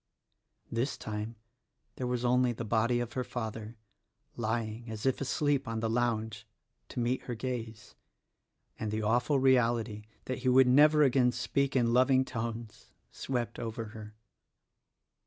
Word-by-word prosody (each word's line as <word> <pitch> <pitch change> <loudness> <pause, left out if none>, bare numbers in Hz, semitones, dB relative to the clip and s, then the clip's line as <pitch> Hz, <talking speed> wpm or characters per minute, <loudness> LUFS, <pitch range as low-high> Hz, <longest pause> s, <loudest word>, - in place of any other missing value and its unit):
This 120 +5 -1
time 110 +2 -5 0.6
there 125 - -2
was 125 0 -1
only 125 0 +3
the 115 0 -5
body 115 +2 +2
of 120 - -5
her 130 - -1
father 110 -2 -6 0.3
— - - -52 0.3
lying 115 0 -3
as 110 +1 -6
if 130 0 +1
asleep 140 0 0
on 115 -1 -2
the 110 0 -1
lounge 110 -3 -1 0.2
— - - -48
to - - -5
meet 120 +2 -1
her 120 - -4
gaze; 115 -3 -5 0.9
and 110 - -2
the 110 +1 -2
awful 120 +6 +2
reality 120 -5 +2 0.2
that 130 - -3
he 130 0 +1
would 130 +1 +6
never 150 +4 +6
again 130 -2 +4
speak 135 +3 -1
in 120 -2 +3
loving 130 +1 +4
tones, 115 -2 -6 0.2
swept 125 -3 -3
over 115 -1 -4
her. 110 -1 -10
120 Hz, 155 wpm, -31 LUFS, 110-130 Hz, 0.9 s, would